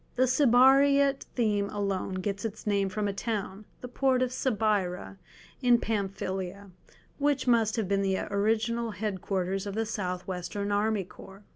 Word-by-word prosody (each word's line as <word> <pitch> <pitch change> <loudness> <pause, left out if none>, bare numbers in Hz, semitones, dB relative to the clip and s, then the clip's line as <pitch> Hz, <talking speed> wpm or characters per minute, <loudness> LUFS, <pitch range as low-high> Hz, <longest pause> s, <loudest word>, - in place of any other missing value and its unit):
The 255 - +3
Cibyrrhæot 275 +2 +4
theme 210 -4 +1
alone 195 -2 -2
gets 195 +2 -3
its 220 -1 -5
name 200 -2 +1
from 210 +2 -2
a 200 - -2
town, 205 -1 -4 0.2
the 250 - -6
port 255 +1 +1
of 255 0 -2
Cibyra 205 -6 -1 0.4
in 245 -2 +5
Pamphylia, 195 -2 -3 0.5
which 285 -2 +1
must 230 -3 +3
have 220 -5 -1
been 200 +1 +1
the 190 -1 +1
original 225 +3 0
headquarters 195 -2 -2
of 200 - -5
the 225 +1 0
South 185 -5 -3
Western 195 +2 -4
Army 205 0 +1
Corps. 195 +2 -14
210 Hz, 150 wpm, -28 LUFS, 195-235 Hz, 0.5 s, in